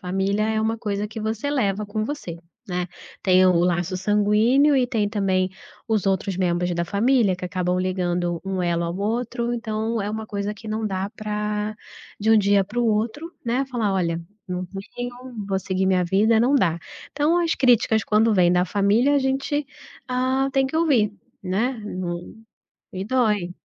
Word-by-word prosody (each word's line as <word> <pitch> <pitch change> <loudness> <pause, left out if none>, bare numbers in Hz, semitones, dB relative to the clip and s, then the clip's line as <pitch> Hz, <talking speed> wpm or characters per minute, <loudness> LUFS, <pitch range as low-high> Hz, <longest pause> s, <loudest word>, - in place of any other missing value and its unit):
Família 195 +2 0
é 220 0 0
uma 220 +1 0
coisa 205 -2 -2
que 220 +1 -7
você 220 +5 -2
leva 210 -7 0
com 215 +1 -2
você, 225 - -5 0.3
né. 180 -1 -2 0.4
Tem 185 -1 +5
o 185 - +5
laço 175 +1 0
sanguíneo 210 +9 +3
e 255 -2 +3
tem 225 -5 0
também 190 -3 0 0.4
os 220 -3 0
outros 195 0 0
membros 180 -1 0
da 170 0 0
família, 205 +1 +2
que 180 - -7
acabam 180 0 -1
ligando 175 -2 -1
um 190 -1 -2
elo 170 -1 0
ao 170 +1 -3
outro, 235 +3 -2
então, 220 0 -2
é 205 - -3
uma 220 0 -4
coisa 205 0 -3
que 215 +2 -13
não 215 0 -2
dá 190 -1 -2
pra 210 -1 -3 0.4
de 220 +2 +1
um 225 - +7
dia 200 -1 +3
para 210 +5 -6
o - - +2
outro, 225 +9 -1
né, 245 +3 0
falar: 235 -6 -1
"Olha, 170 -3 0 0.3
não 180 0 -3 0.3
venham, 245 -2 -6
vou 195 -1 0
seguir 190 0 -1
minha 185 -1 +3
vida", 215 +5 +3
não 250 +5 +3
dá! 175 - +2 0.3
Então 300 +4 +2
as 335 - +1
críticas 235 -4 +3
quando 220 +1 +3
vêm 180 -3 +4
da 180 0 +3
família, 205 - +2
a - - +4
gente, 275 +2 -1 0.4
hã, 260 +2 +1
tem 270 0 +2
que 265 - -8
ouvir, 265 -11 +3 0.3
né. 200 +7 0
Num 180 +2 -5 0.5
e 190 0 -4
dói. 210 -6 +1
210 Hz, 180 wpm, -23 LUFS, 185-235 Hz, 0.5 s, um